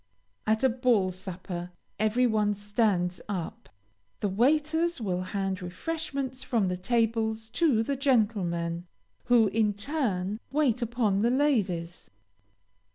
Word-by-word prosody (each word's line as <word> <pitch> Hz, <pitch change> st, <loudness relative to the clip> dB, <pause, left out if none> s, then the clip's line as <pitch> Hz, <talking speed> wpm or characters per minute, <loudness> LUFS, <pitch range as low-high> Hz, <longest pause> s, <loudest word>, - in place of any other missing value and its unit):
At 220 Hz, +3 st, +2 dB
a 265 Hz, -, +6 dB
ball 235 Hz, -6 st, +2 dB
supper 180 Hz, -1 st, -6 dB, 0.3 s
every 220 Hz, +4 st, +2 dB
one 210 Hz, -3 st, +2 dB
stands 205 Hz, -4 st, 0 dB
up. 180 Hz, -5 st, -5 dB, 0.5 s
The 205 Hz, -, +1 dB
waiters 310 Hz, -, +2 dB
will 185 Hz, -5 st, -1 dB
hand 190 Hz, 0 st, -2 dB
refreshment 270 Hz, -, -4 dB
from 230 Hz, -7 st, 0 dB
the 180 Hz, -, -1 dB
tables 225 Hz, +1 st, 0 dB
to 255 Hz, -5 st, +2 dB
the 280 Hz, +4 st, -1 dB
gentlemen, 190 Hz, -, 0 dB, 0.4 s
who, 240 Hz, -2 st, +5 dB
in 210 Hz, 0 st, +1 dB
turn, 205 Hz, -6 st, -1 dB
wait 270 Hz, -5 st, +2 dB
upon 225 Hz, -4 st, +1 dB
the 235 Hz, -, +3 dB
ladies. 205 Hz, -, 0 dB
220 Hz, 120 wpm, -28 LUFS, 185-250 Hz, 0.5 s, a